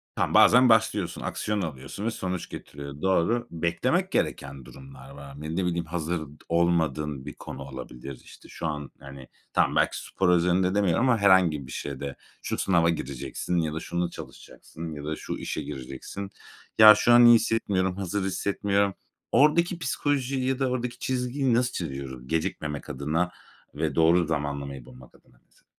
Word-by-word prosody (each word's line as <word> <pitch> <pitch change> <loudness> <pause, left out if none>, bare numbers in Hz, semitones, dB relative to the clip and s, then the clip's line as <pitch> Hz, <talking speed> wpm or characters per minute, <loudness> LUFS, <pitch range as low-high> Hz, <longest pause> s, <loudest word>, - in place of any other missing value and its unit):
tamam - - 0
bazen 125 +2 +7
başlıyorsun, 105 -4 +2
aksiyon 105 -1 -2
alıyorsun 80 +6 -6
ve 115 - 0
sonuç 90 -4 -4
getiriyor. 70 0 -9
Doğru. 100 +6 +1
Beklemek 85 +1 0
gereken 70 -2 -2
durumlar 70 0 -13
var. 70 0 -11
Ne 80 +2 -4
ne 95 -1 0
bileyim, 85 -1 -1
hazır 85 0 -3 0.3
olmadığın 80 -5 0
bir - - -6
konu - - -9
olabilir. 65 -1 -9
İşte - - -16
şu 80 - -5
an 75 -2 -5
yani 70 -1 -11 0.3
tamam, - - +2
belki - - +2
spor 95 -2 0
özelinde 90 +2 +3
demiyorum 105 +5 +2
ama 120 - +4
herhangi 90 -9 +4
bir - - -10
şeyde 70 -1 -5 0.3
şu - - -3
sınava 85 -3 +3
gireceksin 75 +3 -3
ya 80 -2 0
da 80 - -3
şunu 85 +1 -2
çalışacaksın 80 0 -10
ya 75 - -8
da 80 0 -2
şu - - -6
işe - - -4
gireceksin. 70 +9 -7 0.5
Ya, 110 -1 +11
şu 120 +2 +4
an 120 0 +8
iyi 120 0 +9
hissetmiyorum, 95 -5 0
hazır 100 0 -2
hissetmiyorum. 100 0 0 0.4
Oradaki 170 +4 +3
psikolojiyi 135 -2 -1
ya 135 0 0
da 135 - +1
oradaki 125 -1 -3
çizgiyi 130 0 -1
nasıl 125 +1 +2
çiziyoruz? 65 -5 -6
Gecikmemek 80 -3 -3
adına 75 +6 -1 0.4
ve 75 -1 -2
doğru 85 +1 +4
zamanlamayı 70 -4 -3
bulmak 65 -1 -15
adına - - -25
mesela? - - -31
85 Hz, 160 wpm, -26 LUFS, 70-105 Hz, 0.5 s, Ya